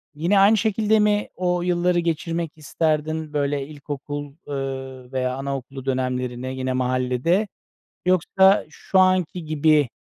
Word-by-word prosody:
yine 175 +6 +2
aynı 210 +3 +6
şekilde 220 0 +2
mi 210 0 +2
o 180 -1 0
yılları 175 0 +1
geçirmek 165 -1 -2
isterdin, 155 0 -1
böyle, 140 -1 -1
ilkokul, 145 -1 -6
ııı, 135 -2 -5
veya 130 -1 -1
anaokulu 135 -1 -5
dönemlerini 130 0 -2
yine 130 0 -1
mahallede? 130 - +1 0.6
Yoksa 190 +2 +4
şu 190 - -1
anki 185 -2 +2
gibi 155 -2 +3
150 Hz, 120 wpm, -23 LUFS, 135-180 Hz, 0.6 s, aynı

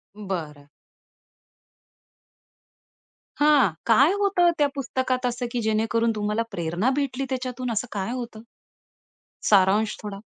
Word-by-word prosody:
बरं. 165 -8 -6 2.7
हां, 290 -7 +5 0.2
काय 260 +8 +5
होतं 385 -4 +3
त्या 290 - +3
पुस्तकात 260 -1 -2
असं 245 0 -2
की 240 - -2
जेणेकरून 225 +1 +1
तुम्हाला 210 +1 -1
प्रेरणा 175 +7 -1
भेटली 275 -2 -2
त्याच्यातून? 255 -1 -3
असं 225 +3 -2
काय 195 +1 -3
होतं? 240 -3 -6 1.1
सारांश 205 +2 +3
थोडा? 205 -2 -6
230 Hz, 105 wpm, -24 LUFS, 210-260 Hz, 2.7 s, हां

